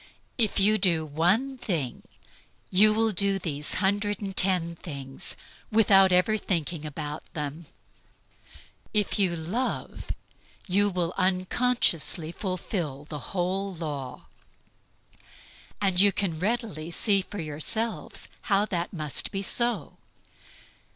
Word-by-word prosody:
If 220 -4 +2
you 215 +2 +4
do 170 -5 +2
one 190 - +1
thing, 165 - -2 0.7
you 210 +3 +6
will 220 +1 +2
do 195 0 +1
these 150 -5 -1
hundred 205 +1 0
and 195 -2 -5
ten 180 -3 +3
things, 140 -5 -5 0.4
without 195 -3 +6
ever 180 +4 +4
thinking 165 -5 -2
about 150 0 -5
them. 150 +1 -5 1.3
If 210 0 +2
you 185 -4 +3
love, 185 +11 -3 0.6
you 205 +1 +2
will 175 -2 -2
unconsciously 185 - +1
fulfill 175 -6 -3
the 150 - -5
whole 190 +1 -2
law." 145 -6 -6 1.6
You 190 +2 +5
can 180 -6 -2
readily 200 -6 -2
see 195 +3 +4
for 205 - -9
yourselves 165 +9 -2 0.2
how 200 0 +4
that 175 -4 -2
must 155 -5 0
be 195 0 -3
so. 235 - 0
185 Hz, 110 wpm, -27 LUFS, 160-205 Hz, 1.6 s, you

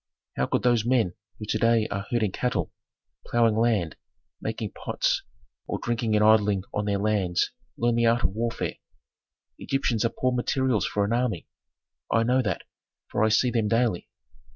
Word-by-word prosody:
How - - 0
could - - 0
those 120 -3 +3
men 120 -6 +2 0.2
who 105 - -6
to 110 +1 -1
day 115 -1 +3
are 100 0 -4
herding 115 -6 +1
cattle, 100 -7 -1 0.6
ploughing 115 -2 +3
land, 110 -8 +1 0.4
making - - -4
pots, - - -1 0.5
or - - -2
drinking 115 -2 -1
and 105 0 +4
idling 105 -3 +4
on 105 - -1
their 100 -1 +1
lands, 100 -4 +1 0.3
learn 120 0 +2
the 115 0 +3
art 115 0 +2
of 85 - +2
warfare? 115 +3 -3 0.8
Egyptians 125 -5 0
are 115 - +2
poor 130 +2 -1
materials 125 -1 +1
for 100 -1 0
an 105 - -1
army. 120 -7 -1 0.6
I 115 - +3
know 125 +3 +3
that, 105 -7 -2 0.5
for - - +1
I 110 - +4
see 120 +3 +3
them 115 -3 +1
daily. 115 -4 0
115 Hz, 170 wpm, -26 LUFS, 105-120 Hz, 0.8 s, and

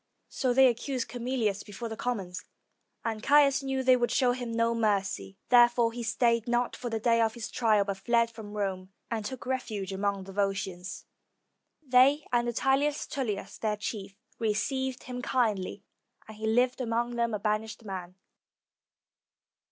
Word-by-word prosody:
So 255 - 0
they 265 +2 +6
accused 250 +1 0
Camilius 235 -5 -1
before 205 +3 -7
the 220 - -5
commons, 195 -7 -3 0.6
and 220 -2 -2
Caius 280 0 +5
knew 270 -1 -2
that 260 - 0
they 255 0 +7
would 240 -1 +1
show 250 -2 +3
him 245 -1 -4
no 230 0 +1
mercy. 195 - -1
There 240 -1 +8
fore 240 -1 +1
he 240 - -5
stayed 230 0 +1
not 240 0 0
for 245 - -5
the 225 -1 -2
day 230 +1 +3
of 225 -1 +1
his 235 -2 -6
trial, 215 -4 +3
but 200 -1 -3
fled 235 +3 +2
from 215 -2 -10
Rome, 190 -2 -3 0.2
and 225 -2 -1
took 255 +3 -6
refuge 215 -7 -3
among 200 0 -1
the 195 0 -10
Volscians. 195 -2 -2 0.8
They 270 +3 +5
and 240 0 +2
Attius 270 +5 +1
Tullius, 210 -7 -4
their 215 -1 -1
chief, 205 -2 -5 0.2
received 245 +4 -1
him 250 0 -6
kindly, 210 -6 0 0.4
and 220 - -10
he 220 0 -3
lived 245 +3 +2
among 240 0 -1
them 235 -2 0
a - - -3
banished 215 +2 -2
man. 185 -2 -6
230 Hz, 165 wpm, -29 LUFS, 205-250 Hz, 0.8 s, There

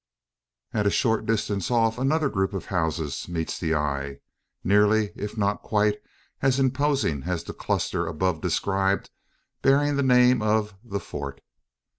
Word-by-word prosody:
At 105 -2 +1
a - - +5
short 110 +1 +1
distance 105 -3 0
off 115 -1 +2
another 150 +3 +2
group 95 -5 -1
of 95 - -4
houses 80 -4 -1
meets 80 -2 -3
the 80 -2 0
eye 70 -2 -2 0.5
nearly, 105 +2 +3
if 105 +2 -6
not 100 -1 0
quite, 105 -1 +1 0.4
as 135 -1 +3
imposing 135 - +1
as 90 -2 -2
the - - -7
cluster 85 -1 -1
above 80 0 -1
described 95 0 0 0.5
bearing 140 +1 +3
the - - +2
name 125 -2 +5
of 105 -1 +1
"The 100 -4 -4
Fort." 70 -5 -7
105 Hz, 145 wpm, -25 LUFS, 85-120 Hz, 0.5 s, a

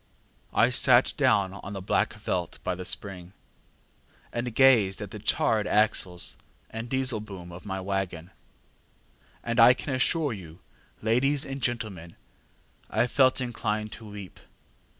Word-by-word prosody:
ŌĆ£I - - +3
sat - - +4
down 95 -2 +2
on 100 +1 -8
the 100 - -4
black 95 - 0
veldt 90 -2 -3
by 90 - -1
the 90 +1 -6
spring, 90 -1 -3 1.0
and 120 -1 -3
gazed 120 -8 +5
at 105 - -7
the 105 - -7
charred 105 +1 +1
axles 100 -5 +1 0.3
and 115 +1 -6
disselboom 110 -9 -2
of 90 +4 -11
my 95 -1 -3
waggon, 95 -2 -3 1.1
and 115 +1 -1
I 120 +2 +8
can 135 +2 -5
assure 140 +2 +1
you, 85 -5 -10 0.5
ladies 135 +6 +2
and 135 0 -6
gentlemen, 105 -9 -3 0.7
I - - +2
felt 130 +1 +3
inclined 110 -4 -2
to 110 -2 -9
weep. 100 -2 -10
105 Hz, 135 wpm, -27 LUFS, 95-120 Hz, 1.1 s, I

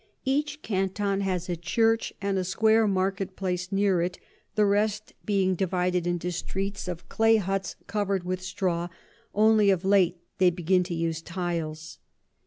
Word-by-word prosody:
Each 295 +2 0
Canton 195 0 -1
has 185 -2 -1
a 175 - -1
Church 225 +7 +1
and 200 -1 0
a - - 0
square 220 +4 +3
Market 190 -1 -1
place 185 -1 -3
near 195 -3 +2
it, 180 +1 -2 0.4
the 210 -1 +4
rest 210 +1 0
being 195 -3 +2
divided 180 -1 0
into 175 0 -1
Streets 195 +3 -4
of 175 -2 -6
Clay 225 0 +4
Hutts 195 -1 -2
cover'd 200 -2 -1
with 185 +1 -3
Straw, 180 -2 -1 0.5
only 215 -1 +5
of 190 -1 +2
late 190 -3 +4 0.2
they 185 -1 +6
begin 180 +1 +1
to 175 -1 -4
use 165 -1 -1
Tiles. 165 -3 -4
190 Hz, 155 wpm, -27 LUFS, 180-200 Hz, 0.5 s, they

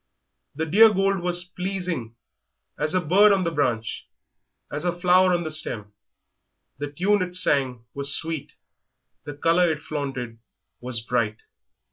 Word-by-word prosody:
The 160 +2 -2
dear 210 +8 +6
gold 195 -1 +1
was 175 0 +3
pleasing 180 - -4 0.6
as 150 +3 -1
a 185 - +2
bird 195 +6 +5
on 195 -2 +2
the 170 - -1
branch, 120 -8 -2 0.6
as 150 +2 -4
a 175 -1 -2
flower 185 +1 +4
on 175 -1 0
the 155 - -5
stem; 105 -9 0 0.9
the 145 0 -5
tune 195 +7 +1
it 180 -1 -3
sang 135 -8 +1
was 140 +1 0
sweet, 160 -3 -5 0.7
the 145 -2 -7
colour 165 +3 +2
it 150 -1 -5
flaunted 130 -6 -5 0.4
was 120 -2 0
bright. 110 -2 -1
160 Hz, 145 wpm, -24 LUFS, 135-180 Hz, 0.9 s, dear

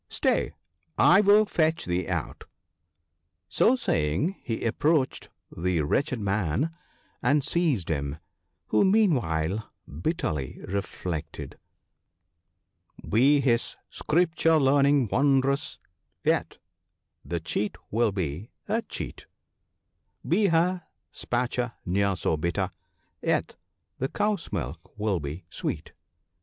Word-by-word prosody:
stay, - - +1 0.5
I 185 +4 +7
will 210 +1 +6
fetch 160 -4 +1
thee 90 0 -1
out! - - -3 0.5
" 80 +1 -52
So 250 - +5
saying 105 - 0
he 115 -1 -3
approached 140 +4 +1 0.3
the 85 -2 0
wretched 130 - 0
man 100 - 0 0.5
and 145 0 +3
seized 145 - 0
him 70 -2 -2 0.3
— - - -51
who 110 - +4
meanwhile 110 - +2 0.2
bitterly 80 - -3
reflected 90 -4 -4 0.5
— 85 -1 -52
" - - -19
Be 140 +6 +5
his 120 -3 +1 0.2
Scripture 165 -1 +2
learning 140 -1 +4
wondrous, 140 +3 +2 0.5
yet - - +1 0.7
the 85 - -3
cheat 100 +5 -2 0.2
will 115 0 +2
be 95 - -3 0.2
a 220 +3 +1
cheat; - - -7 1.0
Be 210 -1 +3
her 175 +1 +2 0.5
pasture 120 0 0
ne'er 100 +2 +1
so 80 -2 0
bitter, 85 +2 -1 0.5
yet - - 0 0.4
the 130 - 0
cow's 205 +2 -1
milk 80 - -5
will 105 -4 0
be 75 +4 -6
sweet." - - -4
115 Hz, 110 wpm, -27 LUFS, -, 1.0 s, I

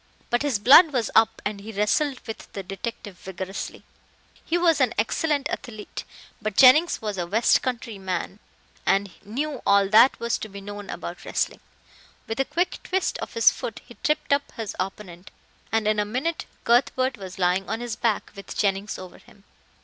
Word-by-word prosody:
But 240 - +2
his 285 -6 +1
blood 285 - +8
was 240 -4 0
up 225 0 +3
and 205 -1 -3
he 220 +2 -8
wrestled 240 +7 0
with 220 - -8
the 195 - -5
detective 195 0 -7
vigorously. 190 +1 -6 0.6
He 340 - 0
was 335 -4 +3
an 245 -3 +2
excellent 285 +6 0
athlete, 215 -5 -6 0.4
but 215 -1 -3
Jennings 275 +3 +6
was 210 -3 -3
a 175 - -2
west 220 +6 +3
country 235 -5 -4
man 190 +1 -4 0.4
and 195 -1 +1
knew 275 +6 -3
all 200 0 +4
that 225 +5 +6
was 235 0 -1
to 220 - -6
be 200 0 -9
known 205 0 -8
about 175 +1 -6
wrestling. - - -2 0.7
With 225 - -5
a 270 - +2
quick 350 +6 -1
twist 380 0 -1
of - - -7
his 230 - +6
foot 240 -4 -6
he 240 - -13
tripped 300 -1 +1
up 280 0 0
his 225 -3 -5
opponent, 185 -1 -6 0.4
and 225 -1 +1
in 215 0 +2
a - - +3
minute 260 +11 -3 0.2
Cuthbert 255 +2 +2
was 190 -1 -8
lying 185 +1 +1
on 225 +1 -2
his 240 -2 -4
back 225 -2 -1
with 200 - -9
Jennings 200 +1 0
over 185 -1 -11
him. 200 - -21
220 Hz, 180 wpm, -25 LUFS, 200-255 Hz, 0.7 s, blood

